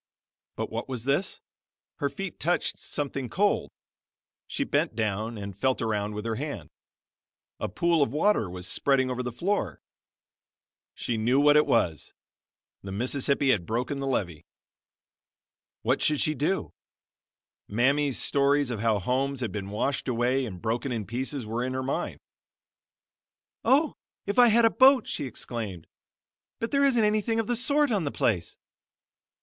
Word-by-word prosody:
But - - -4
what - - -4
was 125 -4 -4
this? 140 +8 0 0.6
Her 140 - 0
feet 195 +3 -6
touched 175 +3 0
something 140 -3 -3
cold! 205 - +1 0.8
She - - -2
bent - - 0
down 110 +1 -2
and 100 -2 -6
felt 130 -1 +1
around 105 -2 -1
with 105 +1 -5
her 115 -1 -2
hand. 145 +2 -5 0.9
A - - -2
pool 170 -2 +2
of 140 - +2
water 150 - +2
was 90 0 -7
spreading 130 +4 +1
over 125 0 -2
the 125 -1 -3
floor. 190 - -1 1.2
She 115 - -2
knew 125 +5 +3
what 145 +1 +6
it 150 - +5
was; 80 -4 0 0.7
the 95 - -7
Mississippi 135 +5 +1
had 90 -8 0
broken 125 +5 -1
through 135 0 -3
the - - +1
levee. 85 - -3 1.4
What - - +1
should 150 -2 +2
she 155 - +2
do? 155 +6 -1 0.9
Mammy's 135 +5 +2
stories 140 -1 +2
of 115 - -3
how 110 -1 +2
homes 130 +6 -1
had 120 - -2
been 100 -2 -5
washed 135 +8 -1
away 125 +2 +1
and 95 -4 -8
broken 120 +6 -2
in 110 -4 -2
pieces 130 +4 -3
were 115 +3 -2
in 130 0 -2
her 130 - -2
mind. 135 - -3 1.4
"Oh, 290 +3 +3 0.3
if 200 +4 0
I 245 - +8
had 230 +1 +5
a 225 - +5
boat!" 260 -2 +6
she 145 - -3
exclaimed. 110 -8 -6 0.7
"But 230 - -3
there 280 0 +3
isn't 245 -5 +3
anything 215 +2 +1
of 225 - 0
the 245 - 0
sort 285 +3 +2
on 200 -5 +1
the 140 - -2
place." 90 -7 -1
130 Hz, 160 wpm, -27 LUFS, 110-155 Hz, 1.4 s, I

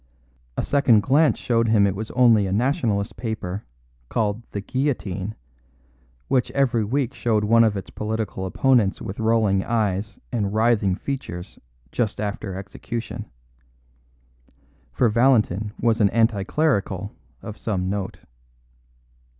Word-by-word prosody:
A - - 0
second 130 -7 +4
glance 145 +6 +3
showed 115 -1 +1
him 110 -2 +4
it 100 -1 0
was 110 +2 -5
only 115 -5 +5
a - - -3
Nationalist 115 - 0
paper, 105 -5 -4 0.4
called 110 0 0
The 100 - -4
Guillotine, 110 -5 -2 0.9
which 130 -2 +1
every 125 -5 +2
week 125 +4 -1
showed 110 -3 0
one 115 +2 +5
of 110 -3 +2
its 95 - -7
political 105 -3 -3
opponents 115 -1 +2
with 95 - -6
rolling 110 -4 +2
eyes 105 -2 -1
and 105 -4 -1
writhing 110 -4 +3
features 95 -9 -6 0.3
just 110 -4 -1
after 100 -2 -3
execution; 100 +4 -6 1.7
for 125 - +2
Valentin 110 -4 +2
was 115 -1 +2
an 100 - +5
anti 110 -1 +2
clerical 100 - 0 0.3
of 110 - -6
some 95 -6 -2
note. 95 0 -3
110 Hz, 125 wpm, -23 LUFS, 100-120 Hz, 1.7 s, only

